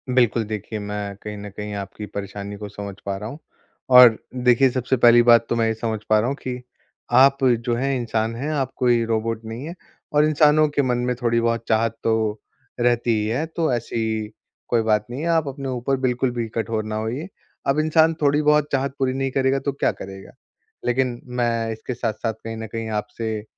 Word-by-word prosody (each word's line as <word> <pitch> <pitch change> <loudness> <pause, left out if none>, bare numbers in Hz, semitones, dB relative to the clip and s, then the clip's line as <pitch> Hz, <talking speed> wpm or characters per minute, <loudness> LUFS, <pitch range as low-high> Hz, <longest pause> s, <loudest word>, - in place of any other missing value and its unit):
बिल्कुल, 120 -2 +3
देखिए 110 0 -5
मैं 105 -1 -5
कहीं 105 -1 -6
न 105 0 -7
कहीं 105 0 -5
आपकी 100 +1 -6
परेशानी 100 0 -6
को 105 0 -7
समझ 100 -1 -7
पा 100 -1 -2
रहा 105 +2 -6
हूँ 145 - -9 0.6
और 120 -3 +9 0.3
देखिए 125 +2 +5
सबसे 130 +1 0
पहली 120 0 +7
बात 115 -1 +7
तो - - +1
मैं 115 -1 +2
ये 110 - +1
समझ 110 -1 -3
पा 110 0 +5
रहा 110 - 0
हूँ 135 - -1
कि, 125 -1 -5 0.5
आप 135 +3 +6
जो 120 -1 +2
हैं 135 +3 0
इंसान 115 -1 -1
हैं, 140 +6 -3
आप 135 -4 -1
कोई 120 -2 +3
रोबोट 115 0 -1
नहीं 115 +5 -6
हैं 170 +2 -7 0.4
और 150 0 +5
इंसानों 155 0 +4
के 145 -1 +1
मन 125 -2 +1
में 125 - 0
थोड़ी 115 -1 +2
बहुत 115 0 0
चाहत 115 0 +1
तो 110 -1 0 0.4
रहती 120 0 +2
ही 105 - -1
है, 125 +8 -1
तो 160 -2 -1
ऐसी 110 -2 -2 0.4
कोई 120 -2 +3
बात 105 -1 +1
नहीं 130 +4 -5
है, 165 - -2
आप 165 -3 +2
अपने 135 0 -5
ऊपर 130 +2 -1
बिल्कुल 125 0 +1
भी 120 -2 -3
कठोर 110 -1 -1
ना 110 0 -4
होइए। 115 - -3 0.4
अब 135 +2 +2
इंसान 160 +1 +4
थोड़ी 145 0 +3
बहुत 150 0 +3
चाहत 135 0 -1
पूरी 130 -1 +1
नहीं 135 0 -2
करेगा 135 0 +1
तो 140 - -2
क्या 140 - 0
करेगा? 95 0 -10 0.5
लेकिन 125 -1 0
मैं 120 -2 -1
इसके 110 +3 -5
साथ-साथ 115 -1 -2
कहीं 115 0 -5
न 110 0 -6
कहीं 115 -1 -4
आपसे 105 0 -3
120 Hz, 205 wpm, -22 LUFS, 110-135 Hz, 0.6 s, और